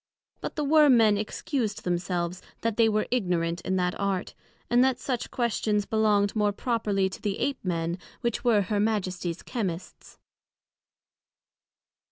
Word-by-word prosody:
But -, -, -5 dB
the 300 Hz, -, -1 dB
Worm 295 Hz, -3 st, +6 dB
men 215 Hz, -2 st, +5 dB
excused 215 Hz, +1 st, -2 dB
themselves, 175 Hz, 0 st, -2 dB, 0.2 s
that 230 Hz, -2 st, 0 dB
they 225 Hz, -1 st, +4 dB
were 215 Hz, 0 st, +1 dB
ignorant 175 Hz, -7 st, 0 dB
in 190 Hz, -, -1 dB
that 180 Hz, -1 st, +1 dB
Art, 200 Hz, -1 st, -1 dB, 0.3 s
and 245 Hz, +1 st, +4 dB
that 260 Hz, -2 st, +2 dB
such 250 Hz, -2 st, -3 dB
questions 215 Hz, -3 st, 0 dB
belonged 210 Hz, -2 st, +2 dB
more 210 Hz, -1 st, +2 dB
properly 205 Hz, -3 st, 0 dB
to 190 Hz, -, -8 dB
the 205 Hz, -1 st, -1 dB
Ape 280 Hz, -2 st, -2 dB
men, 170 Hz, -1 st, -2 dB, 0.2 s
which 235 Hz, -2 st, -1 dB
were 225 Hz, -4 st, +4 dB
Her 205 Hz, +2 st, -1 dB
Majesties 185 Hz, -5 st, -1 dB
Chymists. 190 Hz, -8 st, -5 dB
210 Hz, 145 wpm, -27 LUFS, 185-235 Hz, 0.3 s, Worm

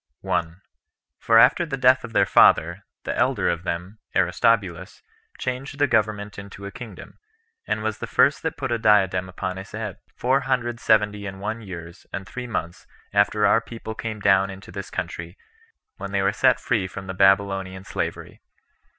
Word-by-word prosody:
1. 85 Hz, +3 st, -2 dB, 0.6 s
For 115 Hz, -, +4 dB
after 125 Hz, +9 st, +6 dB
the 150 Hz, -5 st, -4 dB
death 130 Hz, 0 st, +4 dB
of 120 Hz, -, -7 dB
their -, -, +4 dB
father, 85 Hz, +5 st, +4 dB, 0.2 s
the -, -, -3 dB
elder -, -, +1 dB
of 85 Hz, -1 st, 0 dB
them, 90 Hz, +5 st, -4 dB, 0.2 s
Aristobulus, 95 Hz, -1 st, +1 dB, 0.3 s
changed 130 Hz, +3 st, -4 dB
the 145 Hz, -, +4 dB
government 105 Hz, -5 st, 0 dB
into 100 Hz, 0 st, -10 dB
a 100 Hz, -, -6 dB
kingdom, 120 Hz, -6 st, -11 dB, 0.5 s
and 110 Hz, -, -1 dB
was 110 Hz, -1 st, -2 dB
the -, -, -5 dB
first -, -, +3 dB
that -, -, -3 dB
put -, -, -3 dB
a 120 Hz, -, 0 dB
diadem 95 Hz, -4 st, +3 dB
upon 90 Hz, 0 st, -4 dB
his 95 Hz, 0 st, -9 dB
head, 105 Hz, -4 st, -5 dB, 0.2 s
four 130 Hz, +2 st, +2 dB
hundred 125 Hz, -3 st, -1 dB
seventy 105 Hz, -2 st, +2 dB
and 95 Hz, 0 st, -7 dB
one 110 Hz, +3 st, -4 dB
years 85 Hz, -3 st, -10 dB
and 95 Hz, -, -5 dB
three 125 Hz, +5 st, -7 dB
months 85 Hz, -7 st, -5 dB, 0.3 s
after 105 Hz, +1 st, +3 dB
our 115 Hz, -, +4 dB
people 115 Hz, -1 st, -8 dB
came 110 Hz, -1 st, -5 dB
down 95 Hz, -1 st, +3 dB
into 95 Hz, 0 st, -10 dB
this -, -, -7 dB
country, 85 Hz, +3 st, -5 dB, 0.6 s
when -, -, -6 dB
they -, -, +1 dB
were -, -, +2 dB
set -, -, +3 dB
free 105 Hz, -6 st, 0 dB
from 95 Hz, +1 st, -8 dB
the 95 Hz, -, -5 dB
Babylonian 95 Hz, -1 st, +2 dB
slavery. -, -, -5 dB
100 Hz, 175 wpm, -24 LUFS, 95-115 Hz, 0.6 s, after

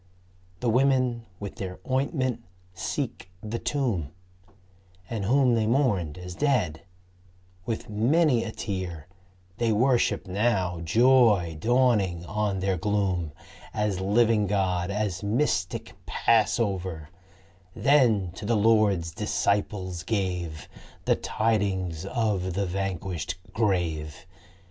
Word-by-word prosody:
The 120 Hz, -, +1 dB
women 125 Hz, -2 st, +2 dB
with 100 Hz, -2 st, -7 dB
their 90 Hz, -2 st, -6 dB
ointment 130 Hz, -1 st, 0 dB, 0.3 s
seek 90 Hz, -, -4 dB
the 110 Hz, +2 st, -3 dB
tomb; 115 Hz, -, -1 dB, 1.0 s
And 110 Hz, -4 st, -2 dB
Whom 130 Hz, +2 st, +4 dB
they 110 Hz, -2 st, +1 dB
mourned 105 Hz, -, +1 dB
as 90 Hz, 0 st, -7 dB
dead, 100 Hz, -, 0 dB, 0.9 s
with 115 Hz, -, -3 dB
many 125 Hz, +5 st, +2 dB
a 110 Hz, -, -4 dB
tear, 95 Hz, -8 st, -5 dB, 0.5 s
They 120 Hz, -2 st, +1 dB
worship 120 Hz, -2 st, +2 dB
now, 95 Hz, -3 st, 0 dB
joy 110 Hz, -3 st, +4 dB
dawning 110 Hz, -7 st, +2 dB
on 105 Hz, -1 st, -1 dB
their 95 Hz, -1 st, 0 dB
gloom, 95 Hz, -4 st, 0 dB, 0.4 s
As 105 Hz, -3 st, 0 dB
living 105 Hz, +1 st, +3 dB
God, 90 Hz, -3 st, 0 dB
as 100 Hz, -2 st, -2 dB
mystic 100 Hz, -4 st, -1 dB
Passover; 95 Hz, -7 st, +1 dB, 0.6 s
Then 115 Hz, -10 st, +3 dB
to 95 Hz, +3 st, -8 dB
the 115 Hz, -1 st, +2 dB
Lord's 105 Hz, -6 st, +3 dB
Disciples 95 Hz, -3 st, -1 dB
gave 90 Hz, -7 st, -2 dB, 0.4 s
The -, -, +4 dB
tidings 95 Hz, -6 st, -1 dB
of 100 Hz, -6 st, -1 dB
the 100 Hz, 0 st, 0 dB
vanquished 90 Hz, -3 st, -3 dB, 0.2 s
grave. 85 Hz, -8 st, -1 dB
100 Hz, 105 wpm, -26 LUFS, 90-115 Hz, 1.0 s, Whom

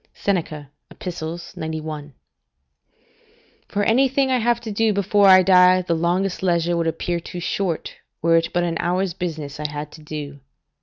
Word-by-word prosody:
Seneca, 155 Hz, -7 st, -2 dB, 0.2 s
Ep., -, -, -14 dB, 0.5 s
91.] 155 Hz, -3 st, -6 dB, 1.5 s
For 205 Hz, -, -1 dB
anything 265 Hz, +4 st, +2 dB
I 255 Hz, -, +2 dB
have 235 Hz, +1 st, +1 dB
to 225 Hz, -2 st, -6 dB
do 220 Hz, +1 st, +1 dB
before 200 Hz, +1 st, +3 dB
I 185 Hz, -1 st, +8 dB
die, 185 Hz, 0 st, +5 dB
the 175 Hz, -, -1 dB
longest 175 Hz, +3 st, 0 dB
leisure 175 Hz, -2 st, +1 dB
would 165 Hz, -1 st, 0 dB
appear 170 Hz, +1 st, -2 dB
too 175 Hz, +1 st, -8 dB
short, 175 Hz, -1 st, -3 dB, 0.2 s
were 165 Hz, +1 st, +3 dB
it 165 Hz, -, 0 dB
but 175 Hz, -, 0 dB
an 170 Hz, -1 st, -1 dB
hour's 180 Hz, +1 st, 0 dB
business 155 Hz, -5 st, -5 dB
I 150 Hz, -1 st, -2 dB
had 150 Hz, 0 st, -6 dB
to 155 Hz, -, -13 dB
do. 150 Hz, -2 st, -7 dB
175 Hz, 160 wpm, -22 LUFS, 160-195 Hz, 1.5 s, I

